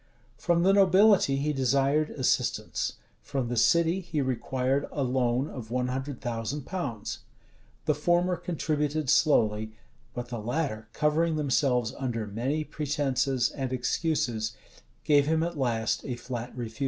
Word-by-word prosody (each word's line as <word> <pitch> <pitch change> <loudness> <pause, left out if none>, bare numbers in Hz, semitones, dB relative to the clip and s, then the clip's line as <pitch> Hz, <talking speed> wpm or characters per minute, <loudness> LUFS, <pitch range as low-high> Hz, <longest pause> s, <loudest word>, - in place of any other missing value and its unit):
From 170 -1 +1
the 195 +2 +5
nobility 195 -5 +5
he 150 +2 0
desired 140 +3 +2
assistance: 130 -3 -1 0.3
from 130 -4 -3
the 120 - -2
city 170 +8 +3
he 170 -4 -3
required 130 +1 0
a 145 - -1
loan 125 +1 +1
of 120 -7 -8
one 125 +1 -1
hundred 135 +1 -4
thousand 120 +4 -3
pounds. 120 - -4 0.7
The 150 - +3
former 175 +4 +2
contributed 155 -4 -1
slowly; 110 -8 +3 0.4
but 120 0 -5
the 120 -2 -4
latter, 110 -1 -2
covering 155 +4 +1
themselves 130 -5 +1
under 120 -5 -2
many 125 +9 -2
pretences 140 -4 0
and 135 -3 -4
excuses, 125 -3 -1 0.5
gave 145 -1 +4
him 160 +1 +2
at 170 0 -3
last 115 -5 0
a 125 - -4
flat 120 0 -6
refusal. 120 +1 -6
135 Hz, 140 wpm, -28 LUFS, 120-155 Hz, 0.7 s, the